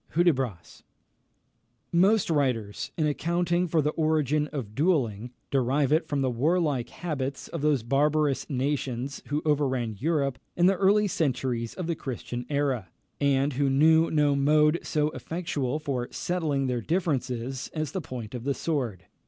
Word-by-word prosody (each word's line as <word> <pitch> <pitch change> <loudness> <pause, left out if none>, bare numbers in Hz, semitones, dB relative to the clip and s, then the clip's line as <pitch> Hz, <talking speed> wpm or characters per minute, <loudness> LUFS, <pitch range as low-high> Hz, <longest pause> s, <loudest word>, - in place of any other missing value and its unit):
Hudibras. 135 - 0 1.1
Most 190 +2 +3
writers, 125 -9 0
in 155 - +2
accounting 170 +4 0
for 160 -2 +2
the 150 - +1
origin 155 -2 +1
of 130 -9 -6
duelling, 125 - +1 0.2
derive 135 +1 +2
it 160 - +2
from 145 -2 -1
the 130 -1 +1
warlike 145 -1 +1
habits 140 -6 -4
of 165 - -5
those 145 -5 +2
barbarous 145 +3 +1
nations 135 -1 -2
who 145 +2 -1
overran 130 -7 0
Europe 140 -2 0 0.2
in 175 - +4
the 190 - +6
early 200 +2 +3
centuries 130 - -1
of 180 - -4
the 170 - 0
Christian 125 -4 -5
era, 135 - 0 0.3
and 140 0 +2
who 140 +1 +1
knew 160 +4 +5
no 150 -2 +3
mode 150 +3 +4
so 150 -1 0
effectual 155 -5 -3
for 135 -5 -3
settling 155 -6 -1
their 125 -2 -1
differences 135 - -2
as 155 -3 -3
the 190 - -3
point 120 -6 -7
of 120 -2 -5
the 140 +1 0
sword. 120 - -2
145 Hz, 150 wpm, -27 LUFS, 130-160 Hz, 1.1 s, the